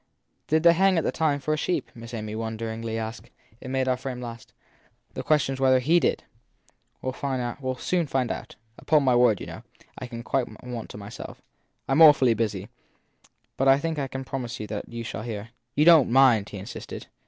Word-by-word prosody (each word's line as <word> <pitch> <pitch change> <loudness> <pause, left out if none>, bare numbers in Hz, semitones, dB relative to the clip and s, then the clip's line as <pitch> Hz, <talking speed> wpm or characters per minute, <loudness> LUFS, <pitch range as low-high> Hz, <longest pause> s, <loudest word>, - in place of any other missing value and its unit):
Did 155 +1 +2
they 170 0 +7
hang 190 +1 +3
at 165 - +1
that - - -1
time 150 -3 +1
for 155 +3 -1
a - - 0
sheep? 165 -2 -2
Miss 115 0 -10
Amy 110 -1 -5
wonderingly 110 0 -4
asked. 110 0 -6 0.3
It - - -8
made 130 0 0
their 130 -1 +2
friend 125 0 -6
laugh 115 -2 -8
again. - - -33 0.6
The - - -4
question 150 -3 +2
s 135 - -7
whether 130 -1 +5
he 155 +8 +3
did! - - 0 0.8
But - - -4
we - - +2
ll - - -4 0.9
find 130 -3 0
out. - - -7 0.2
Upon 150 -2 +3
my 130 -2 +3
word, 120 -4 +4
you - - -6
know, - - -9 0.4
I 130 - -6
quite 120 +2 -2 0.2
want 120 -3 -6
to - - -9
myself. 100 0 -9 0.4
I - - -4
m 145 +4 +4
awfully 140 -6 +7
busy, 105 -3 -2 0.9
but 135 - +1
I 135 0 +7
think 160 +1 -2
I 135 - -2
can 135 0 -6
promise 125 -2 -5
you 105 - -4
that 105 0 -6
you 115 0 -6
shall 115 - -5
hear. 110 -1 -6 0.3
You 150 - +3
don 165 -5 +8
t - - -5
mind? 120 -5 +5
he 100 - -7
insisted. 100 +5 -8
125 Hz, 210 wpm, -26 LUFS, 115-140 Hz, 0.9 s, don